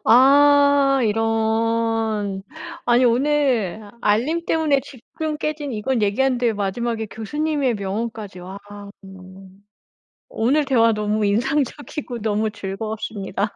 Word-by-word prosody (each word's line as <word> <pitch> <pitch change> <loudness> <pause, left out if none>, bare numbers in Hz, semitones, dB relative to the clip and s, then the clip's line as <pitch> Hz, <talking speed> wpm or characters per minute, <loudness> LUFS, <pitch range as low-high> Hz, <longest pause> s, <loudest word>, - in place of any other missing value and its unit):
아 280 +2 +5
이런. 225 -2 0 0.4
아니 245 +1 +4
오늘 240 -6 +1
알림 265 +12 +1
때문에 310 -5 +2
집중 290 +4 -6
깨진 305 -3 -3
이건 230 +2 -1
얘기하는데 240 +2 +1
마지막에 220 +3 -2
교수님의 280 +4 -2
명언까지 205 -1 -5
와. 190 +2 -8 1.7
오늘 280 +7 +1
대화 230 -4 +3
너무 210 0 -1
인상적이고 255 +4 -1
너무 215 0 0
즐거웠습니다. 205 0 -4
230 Hz, 245 characters per minute, -21 LUFS, 210-275 Hz, 1.7 s, 아